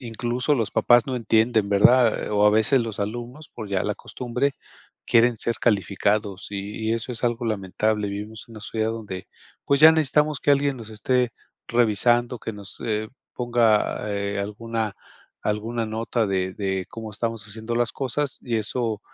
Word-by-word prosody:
incluso 120 Hz, +3 st, -1 dB
los 115 Hz, -6 st, -1 dB
papás 120 Hz, +3 st, +4 dB
no 130 Hz, -, -2 dB
entienden, 110 Hz, -2 st, +2 dB
¿verdad? 115 Hz, +4 st, +4 dB
O 105 Hz, 0 st, +3 dB
a -, -, +6 dB
veces 110 Hz, +5 st, +4 dB
los 115 Hz, -3 st, -4 dB
alumnos, 120 Hz, +8 st, -5 dB
por 110 Hz, -3 st, -8 dB
ya 95 Hz, -2 st, 0 dB
la 105 Hz, -, -1 dB
costumbre, 125 Hz, +6 st, -2 dB, 0.5 s
quieren 120 Hz, 0 st, +4 dB
ser 115 Hz, +1 st, 0 dB
calificados 100 Hz, -1 st, 0 dB
y 105 Hz, +2 st, -4 dB
y -, -, +3 dB
eso 115 Hz, +2 st, -3 dB
es 120 Hz, -, -4 dB
algo 120 Hz, 0 st, 0 dB
lamentable, 105 Hz, +1 st, -1 dB
vivimos 105 Hz, +2 st, -6 dB
en -, -, -14 dB
una 110 Hz, -, -9 dB
sociedad 110 Hz, +1 st, -2 dB
donde, 105 Hz, -5 st, -6 dB, 0.4 s
pues, 140 Hz, 0 st, +2 dB
ya 160 Hz, +1 st, +10 dB
necesitamos 150 Hz, -1 st, +2 dB
que -, -, +2 dB
alguien 140 Hz, -1 st, +2 dB
nos 115 Hz, -3 st, -8 dB
esté 120 Hz, +3 st, 0 dB, 0.4 s
revisando, 120 Hz, +1 st, +2 dB
que 110 Hz, -, -5 dB
nos, 100 Hz, -2 st, -7 dB
eh, 110 Hz, -1 st, -1 dB, 0.3 s
ponga, 115 Hz, -3 st, +1 dB
eh, 100 Hz, 0 st, -2 dB
alguna 110 Hz, +1 st, -3 dB, 0.5 s
alguna 110 Hz, +2 st, -2 dB
nota 110 Hz, +1 st, -1 dB
de 95 Hz, -1 st, -1 dB
de 95 Hz, -2 st, -2 dB
cómo 110 Hz, -1 st, -7 dB
estamos 115 Hz, 0 st, -3 dB
haciendo 110 Hz, +2 st, -5 dB
las 120 Hz, -1 st, +1 dB
cosas, 135 Hz, +1 st, -2 dB
y 120 Hz, -2 st, -1 dB
eso, 110 Hz, 0 st, -1 dB
115 Hz, 170 wpm, -24 LUFS, 105-120 Hz, 0.5 s, ya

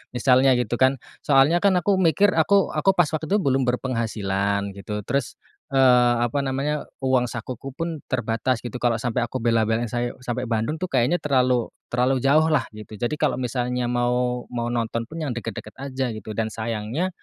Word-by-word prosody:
misalnya 130 Hz, +1 st, +4 dB
gitu 120 Hz, -1 st, -1 dB
kan, 130 Hz, +1 st, +4 dB, 0.3 s
soalnya 145 Hz, +4 st, +4 dB
kan 200 Hz, -2 st, +4 dB
aku 200 Hz, +2 st, +2 dB
mikir, 190 Hz, +3 st, +4 dB
aku 200 Hz, +4 st, +3 dB
aku, 155 Hz, +6 st, +3 dB
pas 175 Hz, -4 st, +4 dB
waktu 155 Hz, 0 st, -3 dB
itu 200 Hz, -, +1 dB
belum 135 Hz, -5 st, +1 dB
berpenghasilan 100 Hz, -5 st, -1 dB
gitu, 105 Hz, +1 st, -5 dB
terus, 135 Hz, 0 st, -2 dB, 0.3 s
eee, 125 Hz, -2 st, +5 dB
apa 140 Hz, +4 st, -2 dB
namanya, 140 Hz, +3 st, -1 dB, 0.2 s
uang 130 Hz, -2 st, +2 dB
sakuku 125 Hz, +2 st, -6 dB
pun 165 Hz, +1 st, -5 dB
terbatas 120 Hz, 0 st, 0 dB
gitu, 120 Hz, -1 st, -8 dB
kalau 115 Hz, -2 st, +2 dB
sampai 120 Hz, 0 st, -1 dB
aku 130 Hz, +2 st, -4 dB
bela-belain 115 Hz, 0 st, +1 dB
saye 120 Hz, +2 st, -2 dB
sampai 125 Hz, 0 st, -3 dB
Bandung 115 Hz, +4 st, -1 dB
tuh 185 Hz, +2 st, -4 dB
kayaknya 130 Hz, +6 st, +2 dB
terlalu 125 Hz, -4 st, +2 dB, 0.2 s
terlalu 125 Hz, +2 st, +1 dB
jauh 155 Hz, +4 st, +4 dB
lah 140 Hz, -4 st, +3 dB
gitu. 105 Hz, -1 st, -10 dB
Jadi 120 Hz, +5 st, -1 dB
kalau -, -, +1 dB
misalnya 125 Hz, 0 st, -1 dB
mau 125 Hz, 0 st, 0 dB
mau, 120 Hz, -1 st, -2 dB
nonton 115 Hz, -1 st, -2 dB
pun 160 Hz, -, -8 dB
yang 140 Hz, -, -2 dB
deket-deket 115 Hz, -1 st, -6 dB
aja 130 Hz, -2 st, -3 dB
gitu. 110 Hz, 0 st, -8 dB
Dan 115 Hz, 0 st, 0 dB
sayangnya 115 Hz, +9 st, -2 dB
125 Hz, 180 wpm, -23 LUFS, 115-135 Hz, 0.3 s, eee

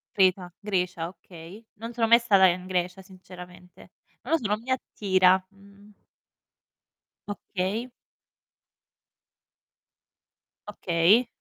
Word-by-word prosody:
Creta, 185 Hz, -2 st, +2 dB
Grecia, 180 Hz, -5 st, -2 dB
okay. 180 Hz, +3 st, -13 dB
Non 230 Hz, +3 st, -8 dB
sono 230 Hz, -1 st, +1 dB
mai 235 Hz, +1 st, +7 dB
stata 200 Hz, -5 st, +4 dB
in 180 Hz, +1 st, -1 dB
Grecia 180 Hz, +1 st, -2 dB
sinceramente. 180 Hz, -1 st, -14 dB, 0.3 s
Non -, -, -4 dB
lo -, -, +5 dB
so, 215 Hz, -, -3 dB
non 210 Hz, +2 st, -1 dB
mi 260 Hz, +2 st, -6 dB
attira, 190 Hz, -6 st, +2 dB
mhmm. 200 Hz, +1 st, -20 dB, 1.4 s
Okay. 205 Hz, +4 st, -4 dB, 2.8 s
Okay. 195 Hz, +5 st, +2 dB
190 Hz, 100 wpm, -26 LUFS, 180-210 Hz, 2.8 s, mai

